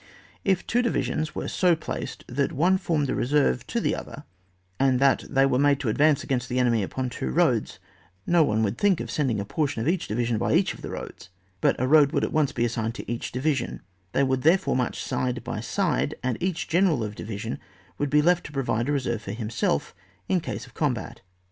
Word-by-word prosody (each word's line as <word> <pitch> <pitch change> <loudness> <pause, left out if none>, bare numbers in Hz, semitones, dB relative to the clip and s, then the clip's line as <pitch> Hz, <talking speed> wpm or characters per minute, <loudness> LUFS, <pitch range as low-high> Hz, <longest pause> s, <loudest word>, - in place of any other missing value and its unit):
If 190 -3 +1
two 245 - +2
divisions 155 -9 -1
were - - -3
so 180 -2 +3
placed 160 - -6
that 140 +3 -1
one 180 +6 +3
formed 160 -5 0
the - - -1
reserve 135 - +1
to - - -1
the - - 0
other, - - -8 0.6
and 135 -2 +3
that 135 0 +3
they 135 -1 +4
were 140 +2 +3
to 135 -4 -3
advance 145 +5 +3
against 125 -2 -2
the 125 - -1
enemy 120 -3 +3
upon 130 +6 -3
two 65 - -3
roads, 65 - +1 0.5
no 175 -2 +4
one 110 -5 +1
would 105 +2 -1
think 200 -4 +3
of - - -5
sending 130 -8 0
a 100 - -3
portion 145 +2 -1
of 115 - -2
each 175 +1 0
divi 120 +3 -1
sion 115 -2 0
by 120 +5 +1
each 185 +3 +2
of - - -13
the - - -6
roads, - - -8 0.3
but - - +3
a 130 - +1
road 145 0 +5
wotdd - - +1
at - - -1
once 155 -3 +2
be 120 - 0
assigned 115 -1 -2
to - - -8
each 120 - -4
divi 140 +5 +1
sion; 130 -3 -4 0.3
they 140 - +3
would 130 -1 +1
therefore 175 +6 +3
march 125 -2 -1
side 125 -1 -2
by 120 -3 -4
side, 170 - 0
and 130 -2 0
each 180 -1 -1
general 170 - +2
of 105 -1 -4
division 105 -1 -5 0.4
would 145 - 0
be 150 +1 +4
left 175 +1 +3
to - - -12
provide 130 -3 -1
a - - +2
reserve 125 -5 -1
for 100 -2 -6
himself 110 0 -1 0.3
in 185 - +2
case 170 - -5
of - - -16
a - - -33
combat. 130 -7 -2
135 Hz, 225 wpm, -25 LUFS, 120-155 Hz, 0.6 s, road